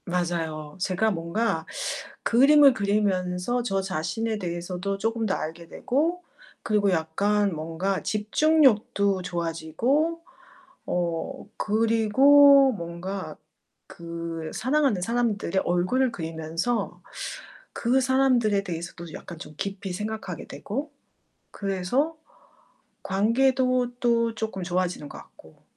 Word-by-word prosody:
맞아요. 165 -4 -3
제가 195 +4 +1
뭔가 170 0 -1 0.6
그림을 275 +3 +6
그리면서 200 0 0
저 195 -5 0
자신에 195 +5 -2
대해서도 180 +2 -3
쪼끔 225 +2 -1
더 190 - +1
알게 165 +2 -6
되고 330 - -1 0.4
그리고 205 -2 +2
약간 195 +5 +1
뭔가 165 +5 -2
집중력도 215 -4 +2
좋아지고 180 - -1 0.7
어 170 -2 -2
그리고 260 +6 +5
뭔가 170 -2 -6 0.5
그 170 -1 -6
사랑하는 260 -5 +1
사람들의 215 -4 0
얼굴을 185 +10 +1
그리면서 165 +5 -3 0.7
그 250 +3 +2
사람들에 250 -6 +2
대해서도 170 -2 -7
약간 170 - -9
좀 155 -1 -10
깊이 195 -1 -4
생각하게 210 -3 -5
되고 275 +8 -5 0.6
그래서 200 - -1 0.9
관계도 250 +4 +2
또 230 -1 +2
쪼끔 220 -4 -4
좋아지는 175 -4 -2
것 - - -10
같고. - - -17
200 Hz, 235 characters per minute, -26 LUFS, 175-240 Hz, 0.9 s, 그림을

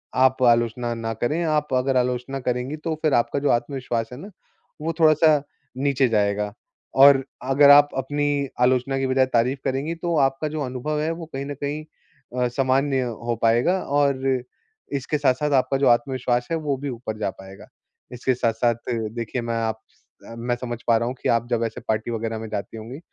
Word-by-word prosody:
आप 130 0 +3
आलोचना 120 0 +2
ना 115 0 -3
करें, 120 +10 -1
आप 150 -3 0
अगर 130 +1 +1
आलोचना 125 +2 -1
करेंगी 125 +4 -2
तो 160 +1 -3
फिर 155 -3 +2
आपका 120 +4 +1
जो 145 - 0
आत्मविश्वास 120 -2 -1
है - - -8
ना, 195 - -9 0.5
वो 165 +2 -2
थोड़ा-सा 155 -1 +5 0.4
नीचे 135 -1 +2
जाएगा। 105 -1 0 0.4
और 135 0 +7 0.2
अगर 140 +1 +6
आप 145 0 +8
अपनी 145 +1 -1
आलोचना 130 +2 +2
की 135 - 0
बजाय 130 0 +3
तारीफ़ 125 +3 +2
करेंगी 140 +5 -1
तो 170 0 -2
आपका 135 +2 +1
जो 155 0 -4
अनुभव 135 +4 -3
है, 160 +2 0
वो 165 0 -6
कहीं 135 - -3
न 145 - -4
कहीं 145 +2 -3 0.6
अ, 125 - +3
सामान्य 135 +2 +1
हो 120 -1 -3
पाएगा 120 +12 +3
और 140 -2 +1 0.7
इसके 140 +2 -1
साथ-साथ 145 +1 +1
आपका 135 0 +2
जो 140 - +2
आत्मविश्वास 120 0 +1
है 165 - +1
वो 150 -3 -1
भी 140 +2 -5
ऊपर 115 -3 -5
जा 105 - 0
पाएगा। 95 0 -13 0.5
इसके 125 +1 0
साथ-साथ 115 0 +1 0.4
देखिए 115 +2 -3
मैं 115 0 -3
आप 110 -1 -2
स - - -33 0.4
मैं 120 +1 -1
समझ 120 -1 -5
पा 115 - +5
रहा 115 - -1
हूँ 125 - -3
कि - - -1
आप 115 0 +2
जब 115 -1 0
ऐसे 115 - -5
पार्टी 110 +2 -1
वग़ैरह 115 0 -3
में 110 - -6
जाती 100 +2 -5
होंगी। 115 +6 -8
130 Hz, 190 wpm, -23 LUFS, 120-145 Hz, 0.7 s, आप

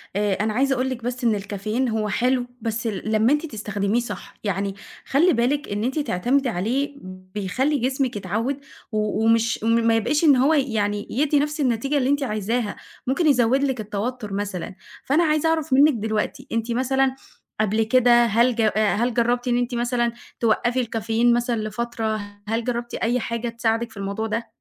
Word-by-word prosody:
آآ، 205 0 +1
أنا 210 +2 -1
عايزة 270 +3 +2
أقول 260 +1 0
لِك 245 -2 -5
بس 250 +1 -4
إن 225 -3 +3
الكافيين 215 +5 -2
هو 220 -1 -1
حلو، 250 +4 +1 0.2
بس 225 +1 -2
ال 215 0 -3
لمّا 220 +5 +4
أنتِ 300 +2 0
تستخدميه 210 -3 -1
صح 240 - -6
يعني 200 -1 -2 0.3
خلي 335 +7 +3
بالِك 270 +5 0
إن 205 +1 -2
أنتِ 265 +6 -1
تعتمدي 260 +2 +1
عليه 250 +9 -1 0.4
بيخلّي 255 +10 0
جسمِك 260 0 0
يتعود، 220 +8 -2 0.3
و 215 0 0
ومش 230 -1 +2
ما 230 +1 +3
ما 230 0 +3
يبقاش 290 +8 +1
إن 290 -4 +7
هو 275 +5 +4
يعني 210 -7 0
يدّي 290 +3 +2
نفس 300 +1 -1
النتيجة 270 +3 +1
اللي 260 -1 +1
أنتِ 285 0 +2
عايزاها، 215 -1 -1 0.3
ممكن 295 +6 +2
يزوّد 265 0 +3
لِك 265 -3 0
التوتر 210 +1 -4
مثلًا، 195 -2 -4 0.3
فأنا 300 +6 +3
عايزة 310 0 +2
أعرف 320 -3 0
منِّك 285 +3 +6
دلوقتي، 220 -2 -2
أنتِ 230 +1 -1
مثلًا 265 +2 +1 0.5
قبل 215 +1 +2
كده 240 +1 +5
هل 235 +2 +3
ج 230 - 0
آآ، 215 -1 +2
هل 240 +2 0
جرّبتِ 240 +1 +1
إن 240 -1 +2
أنتِ 245 0 -1
مثلًا 240 0 0 0.3
توقّفي 240 +2 +1
الكافيين 230 +1 +1
مثلًا 240 0 +1
لفترة؟ 225 0 -2 0.3
هل 225 +2 -1
جرّبتِ 240 0 -3
أي 240 +2 0
حاجة 235 0 -3
تساعدِك 230 0 -1
في - - -15
الموضوع 200 +3 -3
ده؟ 230 +1 -3
235 Hz, 180 wpm, -23 LUFS, 215-260 Hz, 0.5 s, إن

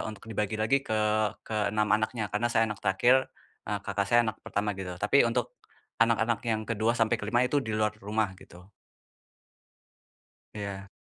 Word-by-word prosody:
untuk 110 0 -8
dibagi 110 0 -2
lagi 135 +5 +2
ke - - -4 0.5
ke-6 105 0 -1
anaknya 110 0 0
karena 120 +4 -1
saya 115 -1 +3
anak 105 - -4
terakhir, 125 +7 +3 0.3
eee, - - -3
kakak 100 - -1
saya 120 +4 +4
anak 110 -3 -1
pertama 105 0 -2
gitu, 95 -2 -5
tapi 110 +6 +4
untuk 115 - -1 0.4
anak-anak 115 0 +2
yang 110 -2 -1
ke-2 115 0 +1
sampai 115 0 +2
ke-5 110 +3 0
itu 130 +2 +1
di 110 - -3
luar 105 0 0
rumah, 105 0 -1
gitu. 90 +1 -16 1.9
Iya. 100 -2 -6
110 Hz, 160 wpm, -28 LUFS, 105-115 Hz, 1.9 s, saya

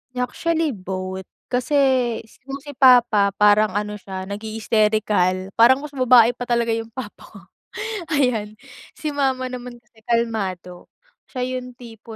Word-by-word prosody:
Actually, 320 +5 -1
both. 190 -2 -6 0.2
Kasi 250 +4 -1 0.7
kung 275 0 -5
si 290 - -8
papa 245 -6 +5
parang 210 -1 +4
ano 210 0 -3
siya, 190 -1 -7
nagha-hysterical. 210 -2 0
Parang 260 +4 +6
mas 300 - -7
babae 250 -3 +5
pa 245 0 -7
talaga 235 -1 +1
yung 225 0 -4
papa 230 -2 -9
ko, - - -14 0.7
ayan. 240 -8 0 0.4
Si 305 - -4
mama 265 -3 -1
naman 250 -1 -7
kasi 225 -1 -27
kalmado. 195 -7 -2 0.4
Siya 255 -2 -3 0.2
yung 250 -1 -11
tipo 230 -2 -12
230 Hz, 135 wpm, -21 LUFS, 210-250 Hz, 0.7 s, Parang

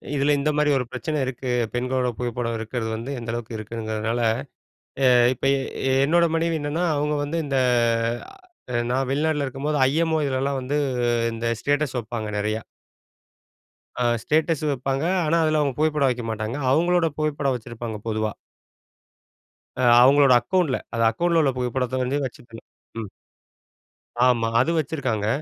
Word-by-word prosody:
இதில 145 +1 +2
இந்தமாரி 150 +1 +1
ஒரு 125 - -2
பிரச்சனை 150 +4 -3
இருக்கு. 130 0 -4 0.2
பெண்களோட 125 +1 0
புகைப்படம் 120 -1 -2
இருக்கறது 115 0 -3
வந்து 125 +5 -5
எந்த 115 -1 -5
அளவுக்கு 120 -1 -5
இருக்குங்கிறதுனால 110 +1 -3 0.9
அ - - +6 0.3
இப்ப 130 - -6
எ 135 0 -2
என்னோட 170 +3 +4
மனைவி 165 0 0
என்னன்னா, 145 +4 -2
அவுங்க 150 +1 0
வந்து 155 +3 -2
இந்த 135 -2 -1 1.2
அ - - -1 0.2
நான் 130 +1 0
வெளிநாட்ல 150 0 0
இருக்கும்போது 140 +3 -2
ஐ.எம்.ஓ 160 +2 +1
இதலலாம் 135 +1 -1
வந்து 135 +3 -2 0.6
இந்த 115 +1 -4
ஸ்டேட்டஸ் 145 -2 0
வப்பாங்க 110 -1 -5
நிறையா! 110 +1 -1 1.4
அ - - +3 0.2
ஸ்டேட்டஸ் 155 0 +1
வப்பாங்க. 135 +2 -2 0.2
ஆனா, 160 +2 +2
அதில 155 0 +2
அவுங்க 140 -2 0
புகைப்படம் 150 -3 +2
வைக்க 125 -1 -2
மாட்டாங்க. 110 +3 -3
அவுங்களோட 175 +3 +3
புகைப்படம் 145 -3 0
வச்சிருப்பாங்க 115 -1 -6
பொதுவா. 110 -1 -1 1.5
அ - - -1 0.2
அவுங்களோட 135 0 +6
அக்கவுண்ட்ல 140 +2 0 0.2
அந்த 115 0 +1
அக்கவுண்ட்ல 170 +6 +1
உள்ள 140 -3 +2
புகைப்படத்த 125 +1 -1
வந்து 140 +3 -1
வச்சுக்கணும். 120 -3 -10 0.3
ம். 105 - -7 1.2
ஆமா. 120 -2 +2
அது 130 +7 +2
வச்சிருக்காங்க. 130 -8 -2
135 Hz, 135 wpm, -23 LUFS, 120-150 Hz, 1.5 s, அ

